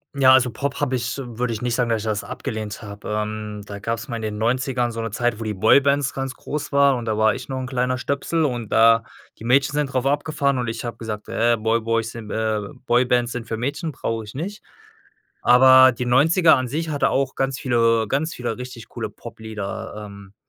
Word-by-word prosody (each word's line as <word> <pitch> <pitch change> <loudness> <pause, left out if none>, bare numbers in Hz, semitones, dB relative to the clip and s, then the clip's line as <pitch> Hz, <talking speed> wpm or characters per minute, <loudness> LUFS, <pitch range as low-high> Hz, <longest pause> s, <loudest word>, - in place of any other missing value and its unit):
Ja, 135 -2 +6
also, 130 -1 +4
Pop 140 +4 -3
habe 140 -3 0
ich 125 +1 -3
würde 120 -1 -3
ich 110 - -5
nicht 120 -1 0
sagen, 125 -1 0
dass 115 -2 +1
ich - - -7
das 105 -1 -1
abgelehnt 110 -2 -5
habe. 105 -1 -9
Ähm, 105 0 -3
da 100 0 -8
gab's 115 +4 -3
mal 120 - -4
in 115 - -5
den 105 -1 -4
Neunzigern 125 +2 0
so 115 0 -4
'ne 115 -1 -4
Zeit, 120 +1 -1
wo - - -4
die 110 -1 -2
Boybands 140 +7 +3
ganz 135 -1 -4
groß 150 +3 -5
waren 140 -2 +4
und 120 - -5
da 110 -1 -1
war 110 0 +3
ich - - -8
noch 130 -1 -3
'n 130 - -4
kleiner 125 0 0
Stöpsel 140 +5 -1
und 120 -6 -3
da 115 0 +5 0.3
die - - -12
Mädchen 135 +4 +3
sind 150 -1 0
drauf 130 0 0
abgefahren 140 -1 0
und 120 - -2
ich 115 - -5
habe 120 - -5
gesagt: 110 -2 -6
„Ey, 115 +1 +2
Boy 115 +1 +1
Boys 115 0 -1
sind, 110 -2 -8
äh 110 -1 0 0.2
Boybands 120 0 +2
sind 120 -2 -6
für 110 - -3
Mädchen, 140 +7 -3
brauche 115 -4 -3
ich 105 - -11
nicht.“ 195 +9 -6 0.8
Aber 130 +1 +7
die 125 +1 -4
Neunziger 160 +7 +5
an 130 -1 -2
sich 160 +5 -3
hatte 145 -2 +1
auch 135 -1 0
ganz 135 0 -1
viele 115 -4 +2
ganz 145 +7 -1
viele 120 -2 -4
richtig 125 -2 -8
coole - - -5
Pop-Lieder. 110 0 -7
Ähm, 100 -1 -13
120 Hz, 225 wpm, -22 LUFS, 110-135 Hz, 0.8 s, Aber